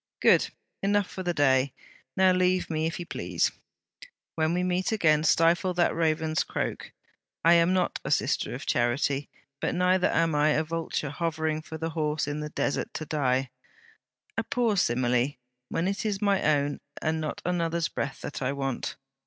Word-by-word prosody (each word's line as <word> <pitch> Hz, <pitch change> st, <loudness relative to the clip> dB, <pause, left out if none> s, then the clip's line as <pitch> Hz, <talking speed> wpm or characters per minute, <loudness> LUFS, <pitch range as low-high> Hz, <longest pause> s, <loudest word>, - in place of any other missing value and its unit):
'Good. -, -, +4 dB, 0.3 s
Enough 205 Hz, 0 st, +2 dB
for 190 Hz, -, -7 dB
the 180 Hz, -1 st, 0 dB
day. 135 Hz, -4 st, +3 dB, 0.4 s
Now 190 Hz, 0 st, +5 dB
leave 185 Hz, -1 st, +1 dB
me, 160 Hz, 0 st, 0 dB
if 165 Hz, -, -4 dB
you 175 Hz, -, -5 dB
please. -, -, -1 dB, 0.8 s
When 160 Hz, 0 st, +1 dB
we 180 Hz, -, 0 dB
meet 180 Hz, +2 st, 0 dB
again, 155 Hz, -8 st, +3 dB
stifle 170 Hz, +3 st, +3 dB
that 175 Hz, -, +2 dB
raven's 160 Hz, -1 st, +1 dB
croak. -, -, -4 dB, 0.5 s
I 170 Hz, -, +7 dB
am 170 Hz, +1 st, +4 dB
not 185 Hz, -1 st, +1 dB
a -, -, -4 dB
"Sister -, -, 0 dB
of -, -, -7 dB
Charity," 130 Hz, +4 st, 0 dB, 0.3 s
but -, -, -1 dB
neither 180 Hz, +1 st, +3 dB
am 165 Hz, -1 st, +2 dB
I 150 Hz, +1 st, +3 dB
a 155 Hz, -, +2 dB
vulture 160 Hz, -3 st, -3 dB
hovering 160 Hz, 0 st, -1 dB
for 160 Hz, 0 st, -8 dB
the 165 Hz, +1 st, -3 dB
horse 155 Hz, -2 st, -1 dB
in 145 Hz, +1 st, -3 dB
the 150 Hz, 0 st, -4 dB
desert 145 Hz, -, -2 dB
to 155 Hz, -, -4 dB
die. 130 Hz, -4 st, 0 dB, 0.9 s
A -, -, -1 dB
poor 235 Hz, -2 st, +1 dB
simile! 125 Hz, -3 st, +1 dB, 0.4 s
when 165 Hz, +2 st, -1 dB
it 195 Hz, +1 st, -2 dB
is 210 Hz, -3 st, -1 dB
my 200 Hz, -2 st, +2 dB
own 145 Hz, -1 st, +1 dB, 0.2 s
and 160 Hz, 0 st, -1 dB
not 155 Hz, -, -4 dB
another's 170 Hz, -2 st, 0 dB
breath 140 Hz, -, -4 dB
that 145 Hz, -, -6 dB
I 130 Hz, +1 st, 0 dB
want. 135 Hz, -2 st, -3 dB
160 Hz, 175 wpm, -27 LUFS, 145-180 Hz, 0.9 s, I